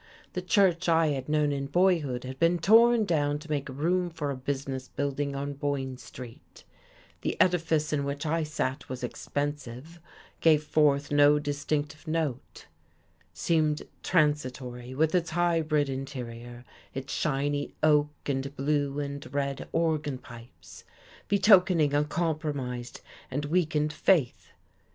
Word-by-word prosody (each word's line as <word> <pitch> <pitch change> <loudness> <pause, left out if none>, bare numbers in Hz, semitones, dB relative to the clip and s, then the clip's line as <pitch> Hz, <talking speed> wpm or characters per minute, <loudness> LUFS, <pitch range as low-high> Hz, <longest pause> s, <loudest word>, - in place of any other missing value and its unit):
The 180 - -2
church 185 -2 +2
I 165 -1 +4
had 135 -1 -3
known 150 -1 +2
in 140 -1 -2
boyhood 155 -7 +1
had 130 +1 -7
been 170 +1 +3
torn 225 +5 +5
down 145 -5 +1
to 150 +1 -12
make 145 -1 -2
room 175 +7 0
for 150 -4 -3
a - - -3
business 135 0 -4
building 140 0 -2
on 140 +1 -3
Boyne 140 -2 -2
Street; 125 -2 -12 0.6
the - - -3
edifice 165 -4 +2
in 145 -2 0
which 140 +2 -4
I 165 +2 +1
sat 150 -3 -3
was 130 -1 -6
expensive, 145 +3 -5 0.4
gave 155 -2 +4
forth 145 -2 +2
no 145 0 +6
distinctive 145 +2 -3
note; 155 -6 -3 0.7
seemingly 150 - 0
transitory 130 -6 -1
with 155 +2 +2
its 175 -2 +1
hybrid 160 -3 +1
interior, 120 -3 -7 0.3
its 135 +1 -5
shiny 145 -1 -1
oak 150 -1 +4 0.2
and 140 0 -2
blue 145 0 0
and 140 -1 -5
red 140 -1 -2
organ 155 -4 0
pipes, 115 -8 -13 0.4
betokening 185 -7 +5
a 145 +1 +3
compromised 145 -7 -3 0.3
and 145 +3 -3
weakened 155 -2 +1
faith. 150 -4 +1
145 Hz, 130 wpm, -28 LUFS, 135-160 Hz, 0.7 s, no